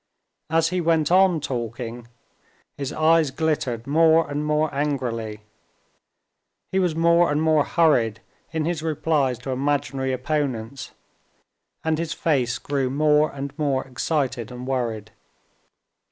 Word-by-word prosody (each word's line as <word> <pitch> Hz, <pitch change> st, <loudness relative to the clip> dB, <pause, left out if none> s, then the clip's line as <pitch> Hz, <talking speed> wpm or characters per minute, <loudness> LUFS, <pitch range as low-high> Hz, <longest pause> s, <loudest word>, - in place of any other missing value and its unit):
As 165 Hz, +1 st, +2 dB
he 180 Hz, 0 st, -1 dB
went 160 Hz, -2 st, +2 dB
on 185 Hz, -2 st, +5 dB
talking, 120 Hz, -3 st, -5 dB, 0.7 s
his 140 Hz, -2 st, -4 dB
eyes 160 Hz, -1 st, +3 dB
glittered 130 Hz, -6 st, -1 dB
more 160 Hz, +3 st, +4 dB
and 145 Hz, +1 st, -3 dB
more 150 Hz, 0 st, 0 dB
angrily; 120 Hz, -7 st, -2 dB, 1.3 s
he 190 Hz, -, +1 dB
was 180 Hz, -4 st, +1 dB
more 170 Hz, 0 st, +4 dB
and 145 Hz, -, +1 dB
more 155 Hz, -2 st, +3 dB
hurried 125 Hz, -12 st, +2 dB, 0.3 s
in 160 Hz, -2 st, -1 dB
his 170 Hz, -2 st, -2 dB
replies 150 Hz, -5 st, 0 dB
to 125 Hz, +3 st, -6 dB
imaginary 135 Hz, 0 st, -1 dB
opponents, 130 Hz, -2 st, -3 dB, 0.9 s
and 160 Hz, -1 st, 0 dB
his 165 Hz, -1 st, -2 dB
face 130 Hz, -7 st, 0 dB
grew 140 Hz, -3 st, -1 dB
more 150 Hz, +2 st, +3 dB
and 140 Hz, 0 st, -6 dB
more 140 Hz, -3 st, 0 dB
excited 130 Hz, -3 st, -2 dB
and 125 Hz, 0 st, -7 dB
worried. 115 Hz, -5 st, -3 dB
145 Hz, 125 wpm, -23 LUFS, 125-160 Hz, 1.3 s, on